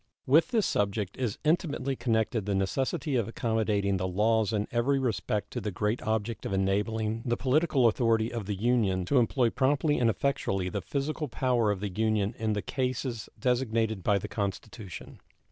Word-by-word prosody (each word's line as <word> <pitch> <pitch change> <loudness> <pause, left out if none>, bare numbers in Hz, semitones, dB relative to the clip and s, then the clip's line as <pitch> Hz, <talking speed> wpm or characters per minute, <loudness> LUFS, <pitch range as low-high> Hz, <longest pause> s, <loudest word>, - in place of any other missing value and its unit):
With 150 +5 +5
this 225 -4 +1
subject 100 -1 -1
is 120 -5 -2
intimately 150 -4 0
connected 110 -3 0
the 100 - +1
necessity 130 - 0
of 115 -4 0
accommodating 110 -4 0
the 95 0 -1
laws 110 +3 +2
in 105 -1 -1
every 120 +4 +2
respect 105 -5 -1
to - - -4
the 105 - -2
great 105 +4 -1
object 110 0 -2
of - - -3
enabling 105 +3 0
the 120 -2 0
political 135 0 +2
authority 115 0 +1
of 115 -5 -4
the 105 - -1
Union 100 -4 +1
to 135 +7 +3
employ 120 0 +2
promptly 145 +2 +2
and 120 -2 +3
effectually 95 -7 -1
the 100 +1 -3
physical 150 - -3
power 125 -3 +1
of 100 -2 -1
the 105 - -2
Union 110 +1 0
in 110 -1 0
the 105 - -2
cases 125 -3 -3
designated 115 -5 0
by 100 +3 +2
the 100 - -4
Constitution. 100 -1 -6
110 Hz, 175 wpm, -29 LUFS, 105-130 Hz, -, With